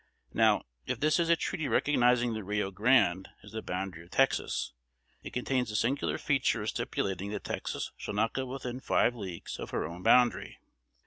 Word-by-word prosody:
Now, - - +4 0.2
if - - -2
this 155 +3 +3
is 170 -1 +1
a 170 - +6
treaty 160 -2 -2
recognizing 125 -2 +3
the 110 -1 -4
Rio 105 0 -1
Grande 100 -3 +3
as 105 - -12
the 110 - -4
boundary 90 -3 -4
of 85 - -18
Texas, 135 +7 +1 0.5
it - - -8
contains 125 -1 -1
the 105 - -5
singular 130 +6 0
feature 135 -4 +1
of - - -1
stipulating 95 0 -2
that 105 - -4
Texas - - -4
shall - - -5
not 110 +2 +1
go 130 -1 -2
within 125 -1 -5
five 120 - +2
leagues 95 -7 -7
of - - -5
her - - -2
own 85 +3 -7
boundary. 120 0 +3
115 Hz, 185 wpm, -30 LUFS, 95-130 Hz, 0.5 s, a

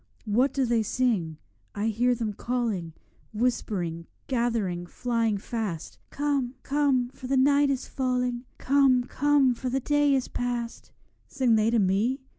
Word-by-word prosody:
What 240 +6 +2
do 270 -2 0
they 235 -1 +2
sing? 210 -9 0 0.4
I 210 +2 0
hear 245 +3 +2
them 220 -3 -3
calling, 215 -8 -2 0.4
Whispering, 185 -8 -1 0.2
gathering, 225 -9 -1
flying 230 0 -1
fast, 205 -6 -5
'Come, 280 -3 -1
come, 275 -4 +1
for 260 0 -10
the 270 +1 +1
night 280 +2 +4
is 270 -1 -2
falling; 250 -1 -1
Come, 265 -2 +3
come, 280 0 +2
for 255 +2 -4
the 265 +2 0
day 290 +1 +2
is 260 - -1
past!' 240 -1 -4 0.4
Sing 255 -3 +1
they 220 0 +3
to 235 - +2
me? 210 +7 +1
245 Hz, 145 wpm, -27 LUFS, 220-265 Hz, 0.4 s, night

